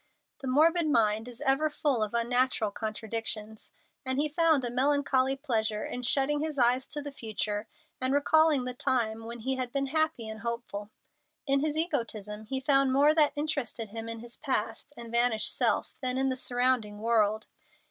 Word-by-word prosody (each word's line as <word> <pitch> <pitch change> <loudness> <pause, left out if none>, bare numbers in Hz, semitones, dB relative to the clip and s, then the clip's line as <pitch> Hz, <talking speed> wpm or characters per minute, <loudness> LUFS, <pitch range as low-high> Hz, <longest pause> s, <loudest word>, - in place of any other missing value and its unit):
The 270 - -7
morbid 320 +5 +3
mind 220 -4 +2
is 245 +1 -11
ever 290 +2 +3
full 290 -5 -1
of 215 +1 -2
unnatural 240 -2 +2
contradictions, 220 0 -4 0.3
and 260 -1 -1
he 300 - +2
found 315 -3 +2
a 240 - -3
melancholy 270 0 +1
pleasure 220 -6 -1
in 250 - -5
shutting 275 +4 +2
his 305 -1 -4
eyes 250 +1 +3
to 295 - -5
the 285 - -6
future 215 -3 -3 0.3
and 255 +1 +1
recalling 290 -1 +3
the 250 - -4
time 225 -3 -1
when 235 0 -8
he 265 +3 -2
had 250 -2 -3
been 275 +1 -1
happy 315 -7 +1
and 220 0 -7
hopeful. 230 -3 -5 0.6
In 275 -1 +2
his 305 +1 -2
egotism 220 - -3
he 265 +4 -2
found 275 -1 +5
more 285 +3 +4
that 305 -2 +3
interested 280 -7 -3
him 225 +2 -7
in 230 -1 -6
his 235 0 -10
past 225 -2 -2
and 235 -1 -8
vanished 235 -2 +3
self - - 0
than 255 -1 0
in 265 0 +1
the 260 - -1
surrounding 245 -4 0
world. 215 -1 +1
250 Hz, 180 wpm, -28 LUFS, 225-280 Hz, 0.6 s, found